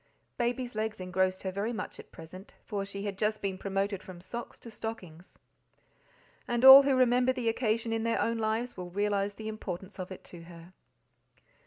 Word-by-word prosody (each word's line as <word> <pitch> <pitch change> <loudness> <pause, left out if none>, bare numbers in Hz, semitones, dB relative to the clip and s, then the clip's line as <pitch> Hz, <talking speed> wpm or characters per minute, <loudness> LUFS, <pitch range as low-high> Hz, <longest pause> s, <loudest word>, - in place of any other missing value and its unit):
Baby's 245 +1 -2
legs 215 -1 -3
engrossed 185 0 0
her 190 - -2
very 200 +5 -2
much 235 - -6
at - - -13
present, 185 +5 -12
for 205 -3 -3
she 200 0 -6
had 200 -2 -4
just 215 0 0
been 195 -1 -2
promoted 195 0 -2
from 185 -2 -11
socks 235 +7 -7
to 230 - -10
stockings, 185 -7 -8 1.1
and 240 +1 +1
all 265 +1 +13
who 275 -1 +2
remember 250 0 +4
the 250 -3 -3
occasion 225 0 0
in 225 - -1
their 230 0 0
own 230 0 0
lives 225 +3 -1
will 180 -1 -7
realize 205 +1 -1
the 220 - -7
importance 200 -2 -6
of 185 +1 -6
it 185 - -9
to 175 - -9
her. 170 +1 -13
210 Hz, 185 wpm, -30 LUFS, 185-230 Hz, 1.1 s, all